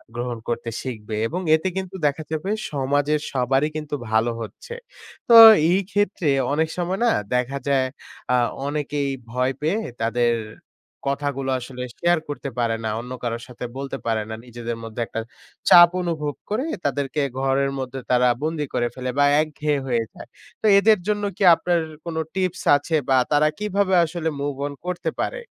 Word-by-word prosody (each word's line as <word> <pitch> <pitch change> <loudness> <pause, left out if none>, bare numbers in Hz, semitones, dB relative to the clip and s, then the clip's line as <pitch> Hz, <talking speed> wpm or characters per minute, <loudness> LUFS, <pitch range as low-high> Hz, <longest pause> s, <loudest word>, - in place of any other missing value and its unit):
গ্রহণ 120 0 -3
করতে 120 0 -2
শিখবে 110 -4 -6
এবং 175 +9 -4
এতে 160 +4 -2
কিন্তু 190 0 -4
দেখা 145 +2 -2
যাবে 160 +5 -3 0.2
সমাজের 145 +2 +1
সবারই 135 +3 +1
কিন্তু 150 -1 -4 0.2
ভালো 110 +2 +2
হচ্ছে। 475 - -8 0.6
তো 235 - +8 0.4
এই 185 - +3
ক্ষেত্রে 205 -5 0 0.2
অনেক 160 +2 +1
সময় 180 +3 -2
না 230 - +4 0.2
দেখা 125 +2 0
যায় 135 -2 +2 0.5
আ - - +5 0.3
অনেকেই 145 -1 -2 0.2
ভয় 125 +2 0
পেয়ে 165 +8 +1 0.2
তাদের 120 +1 +2 0.8
কথাগুলো 140 -1 -2
আসলে 125 0 -7
শেয়ার 175 -1 +2
করতে 145 -1 -4
পারে 115 -1 +1
না 110 - -1
অন্য 125 +2 -8
কারোর 115 0 -3
সাথে 125 0 -7
বলতে 135 0 -4
পারে 110 -2 0
না। 110 - -4
নিজেদের 120 -1 -6
মধ্যে 115 +1 -6
একটা - - -4 0.5
চাপ 175 0 +9
অনুভব 155 -4 -2 0.2
করে 225 +7 -1 0.2
তাদেরকে 145 +1 -1 0.2
ঘরের 135 +1 +1
মধ্যে 130 0 -5
তারা 125 0 +4 0.2
বন্দি 155 -1 -1
করে 120 - +1
ফেলে 130 0 -4
বা 145 - +6 0.2
একঘেয়ে 150 -1 -1
হয়ে 120 -2 +1
যায়। - - -11 0.3
তো - - -4
এদের 215 -1 +4
জন্য 210 -1 0
কি - - -1
আপনার 175 +1 0 0.3
কোন 170 -1 -5 0.2
টিপস 185 -1 -1
আছে 155 +3 -2
বা 130 - +5
তারা 150 +1 +4
কীভাবে 200 -2 0
আসলে 165 0 -3
মুভ 145 0 -2
অন 145 - -7
করতে 180 -1 -2
পারে? - - -3
145 Hz, 165 wpm, -23 LUFS, 125-170 Hz, 0.8 s, চাপ